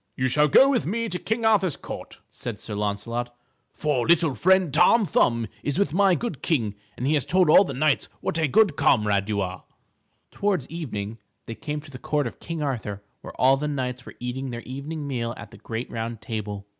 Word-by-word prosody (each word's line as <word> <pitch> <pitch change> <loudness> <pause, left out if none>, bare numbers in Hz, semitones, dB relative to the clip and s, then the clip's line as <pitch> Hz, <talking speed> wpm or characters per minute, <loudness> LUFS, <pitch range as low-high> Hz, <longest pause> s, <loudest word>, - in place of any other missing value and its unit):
"You 130 - 0
shall 150 +4 +4
go 260 - +7
with 255 - +1
me 230 +4 -1
to 180 - -3
King 225 +1 -2
Arthur's 195 -7 +3
Court," - - -8
said 120 -4 -6
Sir 110 - -6
Launcelot, 105 +4 -3 0.4
"for 145 -5 -1
little 165 -3 +4
friend 185 - +3
Tom 180 +7 +5
Thumb 115 -9 +2 0.2
is 145 +2 -2
with 190 -7 +1
my 195 0 +4
good 230 - -4
king 115 - 0 0.2
and 125 - -3
he 145 - +2
has 145 -4 +2
told 180 -3 +3
all 195 - +8
the 140 -9 -5
knights 145 +1 +1
what 165 - -2
a 160 - +2
good 200 +1 +4
comrade 105 -6 +2
you 100 -1 0
are." 90 -1 -4 0.7
Towards 195 -10 -1
evening, 115 -10 -5 0.3
they 115 - -6
came 150 +5 -5
to 145 -1 -14
the 125 - -9
Court 150 -2 0
of 120 - -6
King 165 -2 -4
Arthur 105 -7 -3 0.2
where - - -11
all 135 +1 +5
the 150 +2 -2
knights 125 -3 -3
were - - -12
eating 130 +2 -4
their 120 -1 -5
evening 145 +4 -6
meal 120 -4 -3
at - - -10
the - - -13
great 115 +2 -5
round 115 0 -4
table. 105 -4 -5
135 Hz, 210 wpm, -25 LUFS, 115-165 Hz, 0.7 s, all